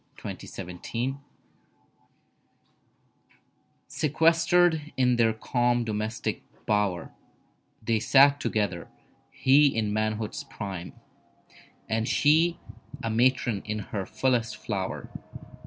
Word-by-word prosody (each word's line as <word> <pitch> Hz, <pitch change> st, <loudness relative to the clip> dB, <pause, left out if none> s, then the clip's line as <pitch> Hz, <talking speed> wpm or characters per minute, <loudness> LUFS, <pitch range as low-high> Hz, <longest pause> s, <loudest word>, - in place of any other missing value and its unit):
DOMESTIC -, -, -8 dB
BLISS 90 Hz, 0 st, -10 dB
IV 125 Hz, +3 st, 0 dB, 2.7 s
Sequestered 165 Hz, +1 st, +2 dB
in 125 Hz, -2 st, +3 dB
their 115 Hz, -1 st, +4 dB
calm 120 Hz, +2 st, 0 dB
domestic 110 Hz, 0 st, -3 dB, 0.2 s
bower, 105 Hz, -5 st, 0 dB, 0.7 s
They 110 Hz, 0 st, +1 dB
sat 140 Hz, +3 st, +5 dB
together. 100 Hz, -10 st, -2 dB, 0.4 s
He 145 Hz, +3 st, +4 dB
in 110 Hz, -5 st, -1 dB
manhood's 110 Hz, 0 st, -2 dB
prime 95 Hz, -4 st, -7 dB, 0.9 s
And 110 Hz, +1 st, -1 dB
she 160 Hz, +5 st, +3 dB, 0.5 s
a 115 Hz, -, -1 dB
matron 120 Hz, -2 st, +2 dB
in 105 Hz, 0 st, -3 dB, 0.2 s
her 100 Hz, -3 st, -2 dB
fullest 120 Hz, -4 st, 0 dB
flower. 95 Hz, -4 st, -4 dB
115 Hz, 90 wpm, -27 LUFS, 105-140 Hz, 2.7 s, sat